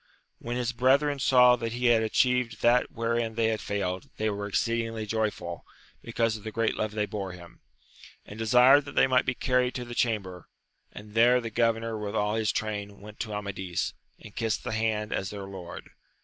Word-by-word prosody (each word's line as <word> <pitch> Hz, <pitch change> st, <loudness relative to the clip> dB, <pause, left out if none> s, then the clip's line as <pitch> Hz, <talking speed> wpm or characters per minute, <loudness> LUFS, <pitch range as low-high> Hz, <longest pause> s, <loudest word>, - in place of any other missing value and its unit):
When 120 Hz, +1 st, -4 dB
his 125 Hz, -1 st, -1 dB
brethren 140 Hz, +4 st, +2 dB
saw 125 Hz, -2 st, +6 dB
that 115 Hz, -1 st, -4 dB
he 125 Hz, +1 st, -3 dB
had 120 Hz, -2 st, +5 dB
atchieved 125 Hz, 0 st, +1 dB
that 120 Hz, +1 st, +4 dB
wherein 115 Hz, -1 st, -1 dB
they 115 Hz, -1 st, +2 dB
had 110 Hz, -1 st, -2 dB
failed, 95 Hz, -3 st, -3 dB
they 110 Hz, 0 st, 0 dB
were 100 Hz, 0 st, -4 dB
exceedingly 115 Hz, +1 st, -1 dB
joyftd, 105 Hz, -6 st, -3 dB, 0.4 s
because 115 Hz, -1 st, -1 dB
of 105 Hz, -, -9 dB
the 110 Hz, -, -5 dB
great 115 Hz, +1 st, 0 dB
love 110 Hz, -1 st, -2 dB
they 105 Hz, -1 st, 0 dB
bore 100 Hz, -3 st, -5 dB
him, 85 Hz, -1 st, -13 dB, 0.7 s
and 105 Hz, -, -10 dB
desired 125 Hz, +5 st, +5 dB
that 145 Hz, -, -9 dB
they -, -, +5 dB
might 130 Hz, -1 st, +2 dB
be 130 Hz, -, 0 dB
carried 125 Hz, -1 st, +1 dB
to 125 Hz, -, -4 dB
the 120 Hz, -, -8 dB
chamber; 100 Hz, -7 st, -2 dB, 0.4 s
and 105 Hz, 0 st, -11 dB
there 120 Hz, +3 st, +5 dB
the 115 Hz, -2 st, -6 dB
governor 115 Hz, -1 st, 0 dB
with 105 Hz, 0 st, -4 dB
all 105 Hz, 0 st, +1 dB
his 110 Hz, -1 st, +1 dB
train 105 Hz, -2 st, -4 dB
went 105 Hz, +1 st, -12 dB
to 110 Hz, -, -4 dB
Amadis, 95 Hz, -3 st, -3 dB, 0.3 s
and 105 Hz, -, -13 dB
kissed 115 Hz, -2 st, -1 dB
his -, -, -3 dB
hand 110 Hz, -1 st, -1 dB
as 95 Hz, -, -2 dB
their 100 Hz, -2 st, -7 dB
lord. 95 Hz, -3 st, -9 dB
110 Hz, 195 wpm, -27 LUFS, 105-120 Hz, 0.7 s, saw